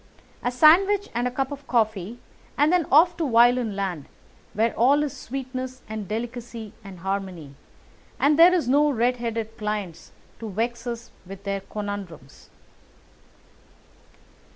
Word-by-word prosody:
A - - 0
sandwich 370 +11 +5
and 240 +1 0
a - - -3
cup 270 +2 -2
of 285 0 -8
coffee, 220 -2 0 0.4
and 295 +4 +3
then 355 -5 +2
off 335 +5 +6
to 320 -5 -1
violin 240 -2 +4
land, 185 -7 -3 0.5
where 225 +2 +1
all 280 +5 +3
is 290 - -4
sweetness 255 0 -6
and 215 -2 -6
delicacy 230 0 -6
and 190 -4 -11
harmony, 190 -6 -4 0.7
and 295 +2 +3
there 345 +2 +9
are 330 - -1
no 290 +3 +4
red 250 -1 +1
headed 225 -2 -4
clients 205 -6 -4 0.3
to 225 - -6
vex 235 +4 -3
us 235 0 -6 0.2
with 195 +1 -10
their 200 -1 -2
conundrums." 195 -9 -8
235 Hz, 140 wpm, -24 LUFS, 205-265 Hz, 0.7 s, there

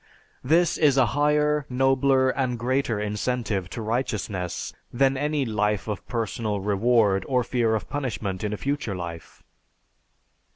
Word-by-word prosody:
This 165 +6 +3
is 145 -4 +4
a 130 - +6
higher, 150 0 +2
nobler, 135 0 +3
and 130 -3 -1
greater 120 -2 0
incentive 105 -2 -2
to 115 - -5
righteousness 105 -6 -3 0.2
than 135 +2 +2
any 145 0 0
life 105 -2 0
of 105 -3 -5
personal 115 -3 -2
reward 105 0 +2
or 125 -2 +2
fear 115 -2 +1
of 110 - -4
punishment 110 -9 -3
in 105 - -1
a 105 - -3
future 140 -6 -2
life. 85 -3 -8
120 Hz, 135 wpm, -25 LUFS, 105-135 Hz, 0.2 s, a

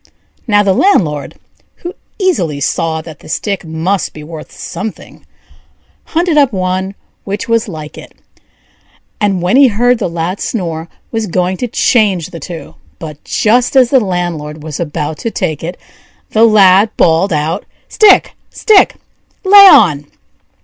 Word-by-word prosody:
Now 205 -2 +3
the 195 -2 +2
landlord, 165 - +1 0.4
who 350 +1 -8 0.2
easily 180 - -1
saw 160 +3 -2
that 155 -3 -11
the - - -15
stick 200 +4 -3
must 165 +4 -2
be 155 - -10
worth 155 0 -10
something, 200 +5 -8 0.8
hunted 335 -2 +1
up 275 -3 +3
one 185 0 -3 0.3
which 200 +1 -5
was 230 0 0
like 155 -5 -9
it, - - -14 1.0
and 195 -4 0
when 185 +8 +2
he 275 -1 +7
heard 245 +2 +1
the 195 - -2
lad 170 +3 -4
snore, 165 -6 -4 0.2
was 225 -2 -2
going 180 +1 -1
to 245 - -3
change 210 - +1
the 165 - -8
two; 165 +2 -9 0.2
but, 150 -3 -10
just 245 +4 +1
as 255 -2 +4
the 270 - +5
landlord 175 -7 -4
was 155 -2 -7
about 150 -2 -4
to 230 - -3
take 170 -9 -3
it, 175 +3 -5 0.5
the 220 +1 +4
Lad 200 -1 +5
bawled 165 +4 +2
out: 155 +1 -2 0.2
"Stick, 425 -2 +4 0.2
stick! 425 -3 +3 0.5
lay 400 +1 +9
on!" 150 - +5
185 Hz, 150 wpm, -13 LUFS, 160-230 Hz, 1.0 s, lay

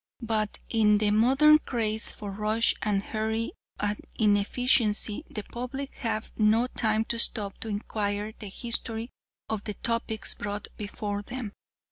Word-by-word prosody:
But 215 -2 0
in 210 -2 +4
the 210 0 +2
modern 270 +8 +6
craze 220 -6 -1
for 205 -2 -7
rush 215 +3 +2
and 200 -2 0
hurry 220 +2 -2 0.3
and 205 0 -1 0.2
inefficiency 210 +2 +3
the 210 - -5
public 255 +5 -6
have 225 -3 -2
no 220 +3 +4
time 220 -3 0
to 235 - -2
stop 205 -3 +2
to - - -6
inquire 205 0 -2
the 210 - -6
history 230 +1 -2 0.4
of 215 -2 -3
the 210 - -4
topics 230 -2 -1
brought 205 0 -5
before 205 0 -4
them. 240 0 -6
220 Hz, 140 wpm, -28 LUFS, 210-230 Hz, 0.4 s, modern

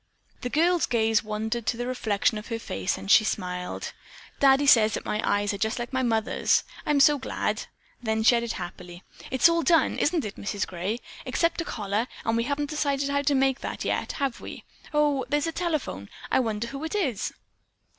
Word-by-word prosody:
The 250 - -3
girl's 340 +5 +2
gaze 225 -2 +2
wandered 215 +1 -3
to 230 - 0
the 245 - -3
reflection 220 -4 0
of 210 - -11
her 230 - -3
face 95 - -3
and 95 +1 -3
she 220 - +8
smiled. 180 -3 -3 0.5
"Daddy 275 +1 +5
says 220 -6 +6
that - - -5
my 210 - -1
eyes 205 0 +1
are 200 - -5
just 220 +3 0
like 240 +2 -5
Mother's. 235 -4 +1 0.2
I'm 295 -1 +3
so 290 +1 +6
glad." 260 - -2 0.3
Then 220 -2 0
she 240 - +6
added 235 -1 -1
happily: 175 0 -8 0.3
"It's 260 +5 +5
all 335 0 +2
done, 330 +2 +3
isn't 315 -3 +1
it, 210 - -6
Mrs. 205 -1 -2
Gray, 190 +7 -4 0.2
except 335 0 0
a - - -5
collar, 210 +2 -2 0.2
and 225 - +1
we 230 0 +1
haven't 290 +2 -2
decided 280 -2 0
how 280 0 +1
to 285 0 +2
make 270 0 +2
that - - -5
yet, - - -1
have 275 -4 -2
we? - - -8 0.3
Oh, 295 -3 +2
there's 295 +1 +1
the 330 - -1
telephone. 310 - -3 0.2
I - - +4
wonder 225 -2 -1
who 275 +3 -6
it 320 - -3
is?" 270 - -1
240 Hz, 195 wpm, -26 LUFS, 215-285 Hz, 0.5 s, she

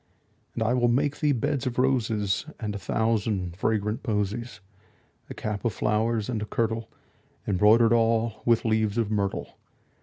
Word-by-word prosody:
And - - 0
I 110 +2 +1
will 120 -1 +3
make 140 +4 +1
thee 150 -2 +2
beds 130 +2 -1
of 125 - -3
roses 115 -4 +1
And 105 -2 -3
a 100 - -5
thousand 100 -3 -1
fragrant 105 +2 -1
posies; 110 0 -2 0.7
10 - - -33
A - - -5
cap 105 -2 -4
of 115 - 0
flowers, 110 0 0
and 115 -4 -2
a - - -2
kirtle 115 0 -2 0.6
Embroider'd 110 +4 +5
all 115 -1 +1
with 115 -1 +2
leaves 110 -1 +1
of 110 -2 0
myrtle. 100 -2 -2
110 Hz, 160 wpm, -26 LUFS, 105-120 Hz, 0.7 s, Embroider'd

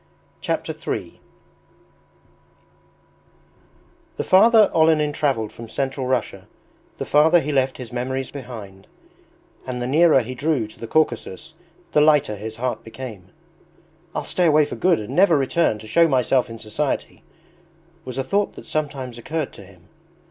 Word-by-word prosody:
Chapter - - -2
III - - -5 3.0
The - - -1
farther 215 +2 +6
Olenin 160 -2 +3
travelled 130 -8 -1
from 115 -1 -11
Central 135 +2 -2
Russia 125 -4 -2 0.5
the - - -4
farther 160 +4 +5
he 150 -1 -3
left 135 -2 +1
his 125 -2 -9
memories 130 +2 -3
behind, 110 -8 -9 0.8
and 125 -1 -4
the 120 - -2
nearer 150 +1 +4
he 125 +2 -6
drew 145 -2 0
to 110 - -16
the 115 - -6
Caucasus 155 -1 -1 0.4
the 150 - +4
lighter 150 -7 +3
his 110 +2 -7
heart 125 +2 -3
became. 115 -6 -9 0.9
"I'll - - -2
stay 180 -2 +1
away 155 -1 +5
for - - -6
good 180 -2 +2
and 105 - -6
never 180 -4 +5
return 135 -3 +1
to 110 - -12
show 165 +10 +4
myself 130 -2 +2
in 115 - -8
society," 110 -1 -3 0.8
was 130 -1 -7
a 135 - 0
thought 200 +10 0
that - - -11
sometimes 135 -5 -4
occurred 155 +3 -4
to - - -12
him. 90 -2 -20
130 Hz, 150 wpm, -22 LUFS, 115-155 Hz, 3.0 s, farther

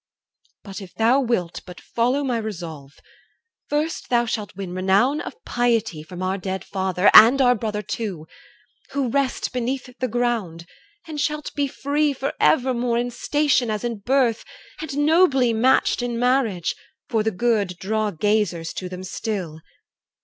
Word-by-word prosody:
But 195 0 -8
if 185 -3 -12
thou 235 +4 +3
wilt 235 -10 -1
but 180 0 -10
follow 250 +5 0
my 250 -4 0
resolve, 165 -10 -7 0.8
First 300 +2 -2
thou 240 -1 +3
shalt 215 -4 -4
win 190 -2 -6
renown 195 +10 +2
of - - -7
piety 230 -9 0
From 180 +4 -8
our 190 +1 -1
dead 190 0 -4
father, 190 -1 +1
and 235 +5 +9
our 250 -2 +5
brother 210 -2 -3
too, 205 -6 -4 0.7
Who 275 -3 0
rest 275 +1 -1
beneath 250 +1 -3
the 255 - 0
ground, 225 -9 -2 0.4
and 305 -2 -4
shalt 300 0 -2
be 285 -1 0
free 290 +2 0
For 270 +1 -3
evermore 245 -3 +2
in 245 +1 -1
station 275 -1 +1
as 215 -1 -2
in 235 -3 -3
birth, 245 0 +1 0.4
And 290 -2 -1
nobly 290 -7 +4
matched 245 +2 +3
in 240 -1 -2
marriage, 240 -8 +1 0.3
for 225 - +1
the 220 - +1
good 205 -3 0
Draw 215 +3 -1
gazers 200 -3 0
to 185 - -5
them 185 0 -7
still. 185 -4 -4
230 Hz, 155 wpm, -22 LUFS, 190-255 Hz, 0.8 s, and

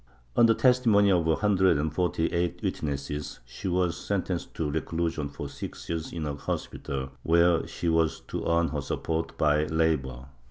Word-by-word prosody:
On 115 - +6
the 115 - +4
testimony 115 -6 +4
of 85 -3 +2
a 80 - +4
hundred 95 -5 +3
and 75 +1 -1
forty 90 -1 0
eight 85 0 -1
witnesses, 75 0 -3
she 65 +10 -7
was 90 -2 +1
sentenced 90 -1 -3
to 75 -3 -1
reclusion 80 -1 -2
for 70 0 -6
six 70 0 -8
years 80 -1 -3
in 80 -2 -4
a 75 - -2
hospital, 70 -1 -4
where 85 0 +3
she 85 - -4
was 80 -1 +2
to - - -5
earn 85 0 +2
her 75 -2 -2
support 80 +3 -3
by 75 0 +3
labor. 75 -6 0
80 Hz, 170 wpm, -27 LUFS, 75-90 Hz, -, On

